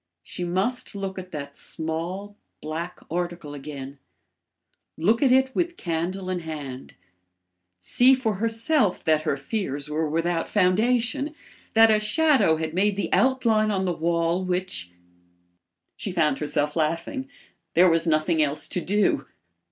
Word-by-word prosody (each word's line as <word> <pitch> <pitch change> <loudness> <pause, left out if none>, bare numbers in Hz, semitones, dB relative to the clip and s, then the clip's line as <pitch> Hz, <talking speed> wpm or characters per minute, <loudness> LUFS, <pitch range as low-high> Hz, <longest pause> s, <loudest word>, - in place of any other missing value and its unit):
She 180 - -5
must 190 +8 -1
look 195 -1 -4
at 185 0 -10
that 140 -2 -6
small, 170 +6 -4 0.2
black 165 +3 -5
article 175 -3 -3
again; 140 -1 -8 1.0
look 215 +9 +2
at 270 -3 +4
it 265 0 +4
with 345 0 -1
candle 175 +3 -3
in 185 -1 -1
hand; 145 -6 -7 0.8
see 250 - +5
for 225 -6 -1
herself 225 - +1
that 155 -2 +3
her 155 -3 -1
fears 145 -2 -3
were 155 0 0
without 165 +2 0
foundation; 240 +9 +1 0.4
that 225 0 +7
a 215 - +4
shadow 260 - +3
had 160 0 -3
made 200 +3 +2
the 200 - -2
outline 235 -5 +3
on 190 -2 0
the 180 - 0
wall 170 +2 0
which 180 - -2 1.1
She 200 - -4
found 155 -6 +1
herself 150 0 -1
laughing. 170 - -1 0.5
There 180 +3 +7
was 165 0 +2
nothing 155 +1 +2
else 150 0 0
to 180 - -2
do. 205 +4 +1
180 Hz, 140 wpm, -25 LUFS, 160-215 Hz, 1.1 s, that